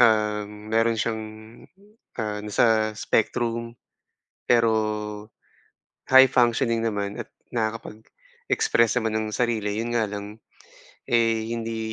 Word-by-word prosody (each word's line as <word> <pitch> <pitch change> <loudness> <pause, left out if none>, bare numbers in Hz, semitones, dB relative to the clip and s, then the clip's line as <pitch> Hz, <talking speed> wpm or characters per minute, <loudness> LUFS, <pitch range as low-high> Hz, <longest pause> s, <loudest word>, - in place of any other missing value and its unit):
um, 105 -1 +1
meron 115 0 +2
siyang, 110 -1 -1 1.0
ah, 105 -2 -2
nasa 110 +1 +2
spectrum. 115 +2 -1 0.7
Pero 115 -2 +4 1.4
high 130 0 +9
functioning 120 -2 +2
naman 105 -2 -2
at - - -13 0.2
nakakapag-express 115 - -1
naman 110 -2 -2
ng 110 - -2
sarili. 110 -3 -1
Yun 120 - -3
nga 115 - +2
lang, 105 +1 -7 0.7
eh, 115 -1 +2
hindi 115 -1 -4
115 Hz, 100 wpm, -24 LUFS, 110-115 Hz, 1.4 s, high